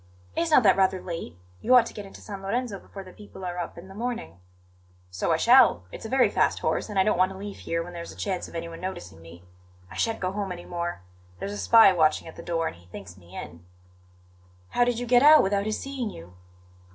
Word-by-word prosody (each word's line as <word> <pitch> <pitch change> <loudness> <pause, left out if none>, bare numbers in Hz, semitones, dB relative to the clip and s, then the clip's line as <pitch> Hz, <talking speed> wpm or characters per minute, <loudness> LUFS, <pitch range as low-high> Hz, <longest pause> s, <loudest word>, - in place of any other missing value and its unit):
"Is 335 - 0
not 300 -5 +5
that 195 -3 +6
rather 190 -1 +2
late? 165 - -7 0.2
You 255 +2 +4
ought 245 -2 +7
to - - -8
get 205 -2 -8
into - - -13
San 200 -2 -8
Lorenzo 205 +1 -2
before 195 - -10
the 185 -1 -14
people 205 -2 -11
are 180 0 -4
up 175 - -5
in 170 +2 -10
the 190 - -12
morning." 215 - -5 0.7
"So 90 - -1
I - - +3
shall; 85 - +5
it's - - -9
a - - -10
very 260 0 +4
fast - - +2
horse; - - -1
and 205 - -5
I 190 - +5
don't 200 -3 +1
want 185 +1 +3
to - - -10
leave 200 +1 -7
here 165 0 -2
when 175 +1 -10
there's 170 -1 -7
a - - -12
chance 190 -3 -3
of - - -13
anyone 165 0 -6
noticing 95 - -7
me. 85 +1 -14 0.5
I - - -10
shan't 225 -1 -1
go 185 0 -2
home 200 -1 -3
any 175 -1 -7
more; 170 - -4 0.3
there's 200 - -5
a - - -5
spy 225 -4 +6
watching 160 -3 +2
at 160 - -10
the - - -9
door, 165 -1 -2
and - - -4
he 85 0 -20
thinks 90 -1 -10
me 90 -1 -16
in." 85 0 -9 1.1
"How 245 - +2
did 245 -1 0
you 245 - -3
get 245 0 +5
out 305 +2 +8
without 200 +1 0
his 215 - -2
seeing 270 -5 -4
you?" 85 - -12
190 Hz, 250 wpm, -26 LUFS, 165-215 Hz, 1.1 s, out